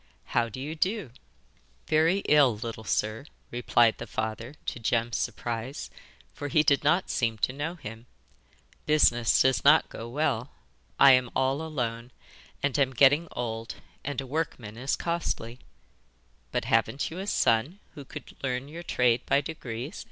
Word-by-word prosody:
'How 115 -1 +2
do 120 - -8
you 145 +4 -4
do?' 185 - -1 0.7
'Very 165 +5 +2
ill, 140 -7 +5
little 115 0 -6
sir, 110 +3 -1 0.3
replied 120 -1 +3
the 115 - -6
father, 110 +5 -4
to - - -4
Jem's 115 +1 0
surprise, 120 +4 -4 0.4
for 145 - -5
he 150 +2 +3
did 140 -3 +3
not 175 +6 +2
seem 115 -3 0
to 130 - 0
know 145 +5 -4
him. 115 -5 -10 0.8
'Business 120 -6 +4
does 130 0 +2
not 150 +3 +6
go 115 +1 -8
well. 130 -2 -1 0.5
I 140 0 +9
am 125 -1 +4
all 135 +3 +1
alone, 120 -7 -3 0.5
and 140 0 +1
am 135 -2 +2
getting 145 +6 +5
old, 115 -2 -4 0.3
and 145 -1 -3
a 135 - -4
workman 130 -7 -4
is 130 +4 -1
costly.' 150 -8 -3 0.9
'But - - -1
haven't 140 +3 +1
you 170 - -6
a 195 - -5
son 125 - +2 0.2
who 145 - -9
could - - -10
learn 130 0 -2
your 165 +3 -8
trade 125 -7 +2
by 140 - +4
degrees? 135 - -6
130 Hz, 155 wpm, -28 LUFS, 115-150 Hz, 0.9 s, I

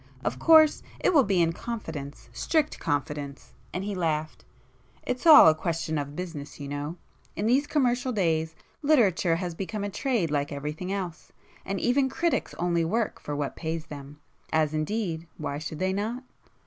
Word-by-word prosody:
Of - - -1
course 315 -2 +6 0.2
it - - +2
will 285 -4 +6
be 190 -4 +3
in 165 0 +1
confidence,—strict 160 - -3
confidence!" 145 -1 -3 0.2
and 180 - -3
he 205 +1 -3
laughed—"It's 165 - -4
all 305 - +11
a 160 - +7
question 160 -1 -2
of 145 0 -5
business 160 -6 -6
you 140 - -6
know,—in 145 +7 -6
these 265 +6 +3
commercial 255 -3 +1
days, 160 -6 0 0.3
literature 205 - +3
has 175 0 -3
become 200 +4 -4
a 205 - -3
trade 210 - 0
like 145 -1 0
everything 150 +6 -4
else, 185 -5 -5 0.3
and 195 0 -3
even 265 +2 +2
critics 335 +5 -1
only 170 -1 +1
[p - - +1
169] 165 - -3 0.2
work - - -19
for 145 - -4
what 145 -1 -3
pays 160 -1 -4
them. 145 -1 -10 0.3
As 155 -1 +2
indeed 165 0 -2
why 145 -2 -4
should 155 0 -6
they 185 +3 0
not?" 225 +6 -3
170 Hz, 165 wpm, -27 LUFS, 150-220 Hz, 0.3 s, all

